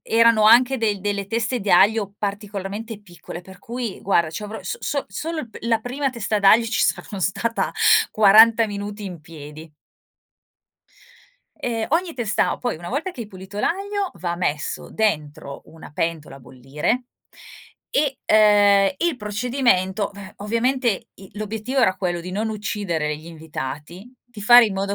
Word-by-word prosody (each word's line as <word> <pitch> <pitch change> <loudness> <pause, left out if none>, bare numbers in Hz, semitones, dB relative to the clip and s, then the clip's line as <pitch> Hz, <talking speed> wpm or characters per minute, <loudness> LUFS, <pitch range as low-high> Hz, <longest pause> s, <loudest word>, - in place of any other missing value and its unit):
erano 230 -1 +4
anche 250 +3 +6
del 210 -3 0
delle 200 0 -2
teste 230 +3 -1
di 195 - -2
aglio 200 +2 +4
particolarmente 205 +1 -5
piccole 175 -2 -10
per 190 +1 -14
cui 235 -1 -6
guarda 170 -4 +2
c'avrò 210 +5 -6
so 180 - -5
so 280 -1 -2
solo 325 0 -4
il 235 - -10
p - - -11
la 230 -1 +1
prima 270 +4 -2
testa 225 -4 -2
d'aglio 210 +4 +5
ci 225 0 -1
saranno 200 - -1
stata 230 +5 -1 0.4
40 220 +2 +6
minuti 205 0 -6
in 180 -4 -7
piedi. 155 0 -11 1.9
E 225 -2 -3
ogni 335 +1 0
testa 230 -4 0
poi 245 -6 -2
una 170 +2 -9
volta 305 +9 -2
che 255 - -10
hai - - -9
pulito 190 +1 -10
l'aglio 400 - -1
va 175 -1 -4
messo 150 -4 -3
dentro 155 -9 -2
una 160 -1 -13
pentola 155 -3 -3
a - - -15
bollire 140 - -3 0.9
e, 280 -2 0
ehm, 205 -1 +5
il 340 -5 0
procedimento 210 -3 0
v 200 -1 -11
ovviamente 230 +1 -1
i 190 0 -15
l'obiettivo 220 +5 -3
era 190 -5 +3
quello 175 -2 -2
di 180 +2 -7
non 215 +4 -2
uccidere 190 -8 -3
gli 155 - -14
invitati, 160 - -8
di 240 -4 -13
fare 240 +1 +8
in 200 - -4
modo 195 +1 -2
205 Hz, 155 wpm, -22 LUFS, 185-230 Hz, 1.9 s, fare